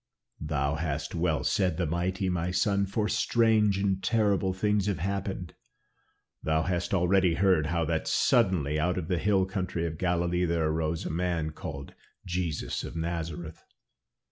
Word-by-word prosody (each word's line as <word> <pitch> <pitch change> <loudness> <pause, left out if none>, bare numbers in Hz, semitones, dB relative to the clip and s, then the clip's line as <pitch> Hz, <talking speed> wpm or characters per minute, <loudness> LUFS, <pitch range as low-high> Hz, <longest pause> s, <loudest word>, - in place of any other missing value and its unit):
"Thou 70 -1 -1
hast 80 -2 -3
well 80 -3 0
said 90 -4 +1
the 90 - 0
mighty, 90 +4 -1
my 90 -1 -1
son, 100 +2 +1
for 105 +2 -1
strange 110 -4 +3
and 95 -1 0
terrible 100 -2 +2
things 105 +1 0
have 100 - 0
happened. 95 -1 -3 0.9
Thou 80 0 +1
hast 90 0 -2
already 90 -1 +3
heard 90 -5 +3
how 85 0 0
that 80 0 -1
suddenly 90 - +2
out 90 +3 0
of 85 -2 -4
the 90 -2 +1
hill 95 +1 +2
country 90 -3 -3
of 80 -1 -4
Galilee 90 0 +1
there 85 -2 +1
arose 80 +1 -1
a - - -3
man 85 -2 -1
called 75 -4 -7 0.3
Jesus 85 -4 -2
of - - -7
Nazareth. 85 -1 -4
90 Hz, 155 wpm, -28 LUFS, 80-95 Hz, 0.9 s, strange